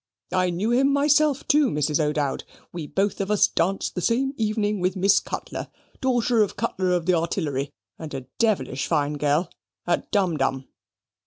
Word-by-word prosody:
I 185 0 +2
knew 190 +7 -1
him 270 +3 +3
myself, 290 0 +2
too, 300 -4 +4
Mrs. 150 +1 0
O'Dowd: 150 -2 -1 0.3
we 165 -4 -5
both 200 +4 -1
of 195 - -3
us 210 -1 +4
danced 190 +4 -1
the 180 - -3
same 260 +7 +1
evening 210 -2 -1
with 185 +1 0
Miss 195 +1 +4
Cutler, - - -6 0.3
daughter 245 -3 +2
of 205 - 0
Cutler 185 -1 -1
of 175 -2 0
the 185 - +3
Artillery, 160 -5 -1 0.3
and 160 -2 -7
a 135 - -4 0.2
devilish 210 - 0
fine 150 -3 +1
girl, 150 +4 0 0.3
at 175 - -1
Dumdum." 150 -10 0
185 Hz, 165 wpm, -24 LUFS, 155-225 Hz, 0.3 s, too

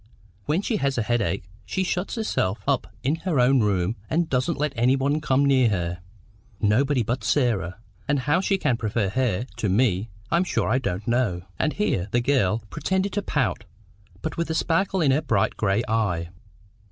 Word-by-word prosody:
When 160 +7 0
she 220 - 0
has 140 -6 0
a 115 - +1
headache, 110 -8 0 0.2
she 190 - -2
shuts 180 +1 -2
herself 125 - -1
up 140 -2 +1 0.2
in 145 +5 +1
her 165 -4 -1
own 130 +2 +5
room, 100 -1 +1
and 170 +1 +1
doesn't 135 +4 0
even 150 -1 0 0.3
let 135 +1 +1
me 155 - 0
come 140 -2 +2
near 130 -4 +4
her—nobody 105 - -2
but 120 +4 -2
Sarah; 100 - +1 0.3
and 145 -2 +1
how 145 +7 +2
she 195 0 +1
can 125 -10 +1
prefer 110 -3 -1
her 120 -1 0
to 105 - -1
me, 105 0 +2 0.2
I'm 170 +2 +3
sure 185 - -1
I 130 +3 +3
don't 100 -4 -3
know." 115 -8 +1 0.2
And 155 - +1
here 100 - 0
the 120 - +2
girl 120 -5 +1
pretended 190 +1 -1
to 205 - 0
pout, - - -1 0.6
but 160 - -4
with 170 -1 -1
a 160 - -1
sparkle 185 +3 +1
in 145 -4 +4
her 140 +4 +2
bright 115 -10 +1
gray 105 +2 +1
eye. 100 -7 0
125 Hz, 185 wpm, -24 LUFS, 105-150 Hz, 0.6 s, own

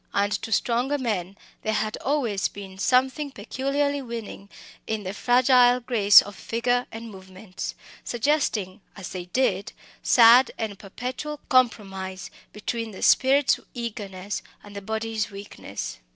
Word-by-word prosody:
And 200 0 +2
to 225 - -6
stronger 245 +6 +1
men 200 -7 -3 0.2
there 220 0 -1
had 215 0 -1
always 250 -9 0
been 190 -1 -10
something 265 +6 +2
peculiarly 275 +4 -2
winning 230 -5 -7 0.4
in 220 -1 -2
the 190 0 -4
fragile 245 +2 +4
grace 215 -5 +6
of 205 -1 -10
figure 245 +2 -1
and 225 0 -8
movements, 190 0 -8 0.3
suggesting, 230 -7 -1
as 190 -4 -7
they 180 -2 -6
did, 200 -1 0 0.3
sad 240 +2 +7
and 210 -3 -4
perpetual 255 +8 -6
compromise 195 -8 0 0.2
between 230 +2 -4
the 200 - -8
spirit's 275 +1 +4 0.2
eagerness 205 -4 -5 0.2
and 205 0 -13
the 200 - -5
body's 220 +1 -3
weakness. 200 0 -7
225 Hz, 130 wpm, -25 LUFS, 200-250 Hz, 0.4 s, sad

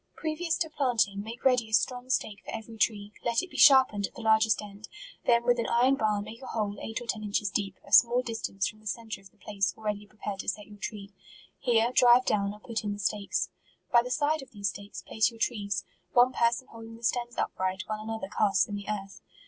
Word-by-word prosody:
Previous 320 +1 -1
to 325 - 0
planting, 240 -10 0
make 225 +5 -9
ready 250 -4 +3
a - - -11
strong 250 +3 +1
stake 210 -5 -1
for - - -11
every 225 0 -7
tree; 210 -2 0
let 235 +6 +1
it 370 - -9
be - - -13
sharpened 260 -8 +6
at - - -23
the - - -8
largest 220 0 +4
end; 205 0 -9 0.4
then 235 0 +4
with 245 0 +3
an 230 - 0
iron 250 +3 +4
bar 210 -4 0
make 220 +3 -10
a 260 - -9
hole 205 -2 -2
eight 225 - -4
or - - -7
ten 225 -2 -2
inches 205 -1 -1
deep, 195 -1 -2
a - - -15
small 245 +1 +6
distance 225 -4 -2
from 215 - -9
the 215 - -12
centre 220 -1 -4
of 195 - -16
the 215 - -33
place 200 -3 -2
already 210 -1 -4
prepared 205 -1 -6
to - - -2
set 210 0 -4
your 205 -1 -14
tree; 200 -1 -6 0.5
here 235 -1 +2
drive 245 0 +6
down 200 -1 +1
or 210 - -11
put 225 0 -4
in 205 -1 -2
the - - -7
stakes; 200 +1 -1 0.4
by 235 - +7
the 245 - -6
side 300 +3 +1
of 270 - -12
these 200 -2 -2
stakes 200 +2 -9
place 220 - +1
your 230 - -14
trees; 205 -4 -1 0.3
one 250 +1 +5
person 235 +1 +1
holding 225 0 -10
the 230 - -19
stems 240 0 -1
upright, 185 0 -1
while 215 -1 -4
another 220 -2 -4
casts 200 -2 +2
in 205 - -7
the 200 0 -5
€arth. 195 -2 -5
220 Hz, 235 wpm, -29 LUFS, 205-240 Hz, 0.5 s, by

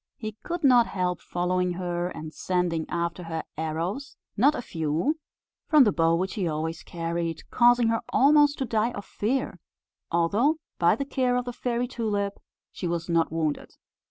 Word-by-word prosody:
He 215 -2 -4
could 345 -1 -4
not 245 -4 +6
help 180 -2 -2
following 180 0 0
her, 175 -1 -2
and 155 -3 -8
sending 180 -3 -1
after 170 +1 -2
her 165 -2 -4
arrows, 165 - -3 0.2
not 280 +8 +4
a - - -3
few, 165 - -1 0.5
from 305 -3 +7
the 210 - +3
bow 165 -2 +3
which 185 +3 -1
he 195 -5 -1
always 160 +1 -3
carried, 165 -1 -3
causing 240 -1 +5
her 225 0 +1
almost 290 +1 +5
to 265 - -1
die 230 +1 0
of 200 - -7
fear; 255 +8 -2 0.5
although, 200 - +2 0.2
by 170 +3 +4
the 275 - -3
care 255 -2 +1
of 250 0 0
the 245 - -4
Fairy 245 0 -1
Tulip, 205 -5 -2 0.3
she 180 - -4
was 170 0 -3
not 165 -2 +2
wounded. 160 -2 -2
185 Hz, 170 wpm, -26 LUFS, 170-245 Hz, 0.5 s, from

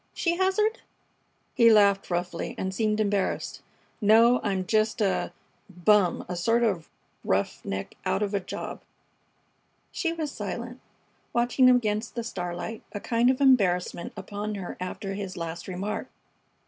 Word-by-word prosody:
she 340 -1 +1
hazarded. 425 +5 +1 0.7
He 230 -1 +6
laughed 200 -2 +4
roughly 175 -1 -3
and 190 0 -3
seemed 215 +1 0
embarrassed. 205 -2 -1 0.4
"No, 230 +4 +5
I'm 190 -3 -1
just 215 +2 +1
a 200 -3 0 0.4
bum! 190 +1 +2
A 180 - -4
sort 230 +7 +2
of 185 -8 0 0.3
roughneck 95 0 -2
out 190 +2 0
of 205 0 -2
a 200 - +2
job." 185 - -6 1.1
She 335 - -1
was 315 -3 -3
silent, 240 +4 -5 0.5
watching 245 +2 +4
him 250 - +7
against 215 -1 -1
the 235 - -2
starlight, 180 0 -5
a 205 - -3
kind 235 +3 +2
of 260 0 +1
embarrassment 195 -11 +2
upon 210 +1 -4
her 190 -3 -6
after 195 +2 -4
his 195 -2 -5
last 170 0 -5
remark. 190 +3 -4
210 Hz, 140 wpm, -27 LUFS, 185-235 Hz, 1.1 s, him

